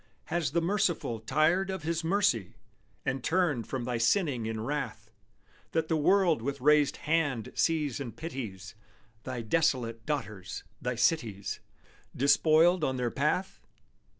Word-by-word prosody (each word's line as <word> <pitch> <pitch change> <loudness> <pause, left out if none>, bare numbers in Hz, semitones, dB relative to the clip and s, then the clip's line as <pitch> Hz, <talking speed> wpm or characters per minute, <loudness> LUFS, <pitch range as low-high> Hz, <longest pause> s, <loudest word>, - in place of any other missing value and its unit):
Has 170 -3 +1
the 165 +4 0
Merciful 175 - 0
tired 160 - +2
of 190 0 -4
His 165 +1 -1
mercy, 160 - +1 0.5
And 130 -1 -2
turned 160 -9 +1
from 130 -2 -3
thy 120 -1 -2
sinning 125 - +1
in 110 -1 -3
wrath, 115 -5 -4 0.6
That 160 -1 0
the 165 - +2
world 170 - +3
with 140 +3 -3
raised 150 +1 +4
hand 145 -8 0
sees 150 -5 0
and 120 -6 -6
pities 115 - -6 0.5
Thy 125 -3 -4
desolate 115 -4 0
daughters, 110 -11 -4 0.2
thy 125 0 -2
cities, 115 -6 0 0.6
Despoiled 160 +5 +4
on 130 -3 0
their 125 -2 -1
path? 150 +7 -1
140 Hz, 135 wpm, -29 LUFS, 115-165 Hz, 0.6 s, raised